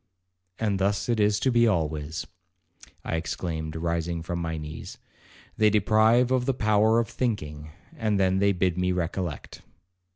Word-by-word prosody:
'And 105 -3 0
thus 100 +1 0
it 115 -2 +1
is 105 0 +3
to 130 - +2
be 120 -1 +4
always,' 80 -5 -1 0.8
I 80 - -1
exclaimed, 80 0 -4
rising 85 0 -2
from 85 0 -3
my 80 -1 -3
knees; 75 +1 -8 0.6
'they 110 0 +5
deprive 110 +4 +3
of 130 -1 +1
the 135 - +1
power 110 -1 +3
of 115 -1 +1
thinking, 75 - -3 0.3
and 105 -3 0
then 95 0 +2
they 100 0 +3
bid 90 -1 0
me 90 0 +1
recollect.' 85 -3 -4
95 Hz, 155 wpm, -26 LUFS, 80-110 Hz, 0.8 s, they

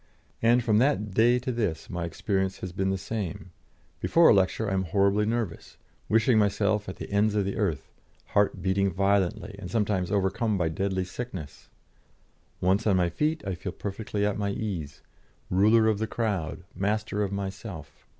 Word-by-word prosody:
And 120 +2 +4
from 110 -2 +3
that 120 -5 +1
day 115 +5 +4
to 125 +1 -3
this 105 -9 -2
my 85 -1 -3
experience 95 +3 -2
has 95 - -4
been 95 +2 -1
the 95 - 0
same; 100 -2 -5 0.5
before 170 0 +5
a - - +8
lecture 100 +3 +2
I 100 - -1
am 95 0 0
horribly 100 +3 +2
nervous, 115 -6 -3 0.3
wishing 115 +1 +4
myself 105 0 +1
at 95 - -6
the - - -8
ends 105 +1 +2
of 100 -2 +1
the 100 - -2
earth, 80 -11 -2 0.4
heart 100 -3 +1
beating 95 +1 +1
violently, 100 +2 0
and 90 - -7
sometimes 100 -4 0
overcome 100 +2 +1
by 85 -3 +1
deadly 95 +2 -1
sickness. 95 - -7 0.9
Once 95 +5 +2
on 100 - +4
my 90 -1 +2
feet, 150 - -1
I 95 - -2
feel 90 +1 -6
perfectly 105 +1 -3
at 105 0 -1
my 100 -1 0
ease, 90 -9 -4 0.5
ruler 110 +4 +5
of 110 -2 +2
the 110 - -1
crowd, 100 -9 -2
master 105 +1 -1
of 100 -2 -1
myself. 95 -6 -7
100 Hz, 175 wpm, -27 LUFS, 95-110 Hz, 0.9 s, a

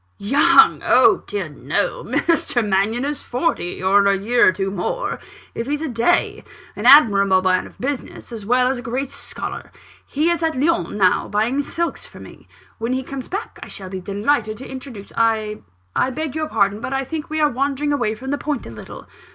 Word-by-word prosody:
"Young! 245 +9 +4
Oh, - - +5
dear 410 - -3
no! - - -2
Mr. 245 -9 0
Mannion 205 +6 +1
is 290 -1 -1
forty, 240 - -2
or 200 +2 +4
a 200 0 +3
year 235 +5 +3
or - - +6
two 195 +2 -3
more, 200 - -3 0.3
if 230 - -4
he's 295 +2 -2
a - - -2
day 245 +7 +1 0.3
an 210 - -1
admirable 200 -9 +6
man 185 0 +1
of - - -18
business, 270 -1 -5
as 225 -3 -7
well 250 +4 +2
as 260 -1 -1
a - - -6
great 255 +3 -3
scholar. - - -8 0.4
He's 330 +4 0
at 320 -5 0
Lyons 335 0 0
now, 185 -3 +2
buying 225 +7 0
silks 340 +4 -3
for - - -14
me. - - -14 0.3
When 230 +3 -1
he 260 0 -2
comes 270 -1 -7
back 405 +4 -6
I - - -8
shall 190 -2 -8
be 190 0 -5
delighted 215 +4 -1
to 260 - -9
introduce 260 -6 -9
" - - -18
"I 220 -2 0 0.5
beg 310 -2 -3
your 310 0 -3
pardon, 205 -1 +1
but 260 - -4
I 270 0 0
think 310 +2 -5
we 310 0 -2
are 300 -1 +3
wandering 280 +3 -1
away 235 -6 0
from 265 +5 -6
the 285 - -1
point, 295 -4 -3
a - - -9
little." 110 - -11
245 Hz, 200 wpm, -20 LUFS, 205-290 Hz, 0.5 s, or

